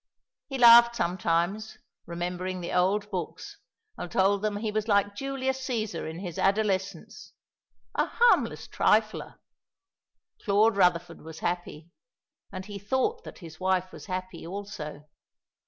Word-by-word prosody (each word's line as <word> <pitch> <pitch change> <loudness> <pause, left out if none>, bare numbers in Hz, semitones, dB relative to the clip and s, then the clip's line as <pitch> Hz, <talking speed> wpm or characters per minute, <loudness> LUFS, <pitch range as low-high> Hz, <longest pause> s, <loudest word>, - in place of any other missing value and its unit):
He 270 - -4
laughed 235 -1 +8
sometimes, 180 +3 -1 0.3
remembering 180 +2 -4
the 175 - -5
old 200 +3 +1
books, 180 -4 -6 0.4
and 175 - -6
told 195 +2 +2
them 210 -1 -1
he 215 0 -2
was 215 +1 -2
like 200 -1 +2
Julius 265 +1 -2
Cæsar 220 - -3
in 160 - -7
his 175 -4 -6
adolescence, 195 -3 -1 0.6
a - - +1
"harmless 480 0 +2
trifler." - - +1 1.1
Claude 210 +1 +3
Rutherford 175 -3 +1
was 160 0 -10
happy; 170 -2 -4 0.6
and 185 -1 -7
he 205 0 -7
thought 260 - -1
that - - -10
his 160 -1 -12
wife 185 0 0
was - - -11
happy 185 -3 -5
also. 170 -6 -7
195 Hz, 130 wpm, -27 LUFS, 175-215 Hz, 1.1 s, laughed